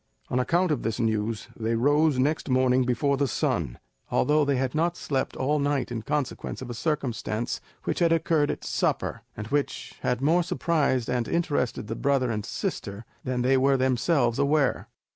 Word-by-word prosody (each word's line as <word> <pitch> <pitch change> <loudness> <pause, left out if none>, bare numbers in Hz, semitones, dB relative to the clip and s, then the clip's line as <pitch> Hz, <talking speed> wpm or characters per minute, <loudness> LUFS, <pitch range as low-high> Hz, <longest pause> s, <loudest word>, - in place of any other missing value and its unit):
On 125 - +2
account 175 +6 +2
of 145 - 0
this 110 +1 -2
news, 110 -1 -1
they 115 0 -1
rose 145 +4 +3
next 145 +3 0
morning 130 0 +3
before 135 +3 +1
the 140 0 +1
sun, - - -1 0.3
although 150 +1 +3
they 140 -1 +1
had 130 -1 -1
not 170 +2 0
slept 135 -2 -2
all 145 +3 +1
night 140 -3 0
in 115 -2 -3
consequence 140 +3 -3
of 130 -2 -6
a - - -4
circumstance 120 -5 -2 0.2
which - - -2
had 170 -1 +3
occurred 160 -2 +2
at - - -3
supper, - - -1 0.2
and 105 - -4
which 140 -2 -2
had 125 - 0
more 160 +6 +3
surprised 150 -7 0
and 125 -2 -1
interested 145 -10 -1
the 110 +2 -4
brother 135 -3 +1
and 105 -2 -3
sister 100 +3 -4 0.2
than 125 -1 -1
they 135 +1 +4
were 135 +1 +3
themselves 130 0 +1
aware. 140 0 +2
130 Hz, 180 wpm, -26 LUFS, 120-150 Hz, 0.3 s, they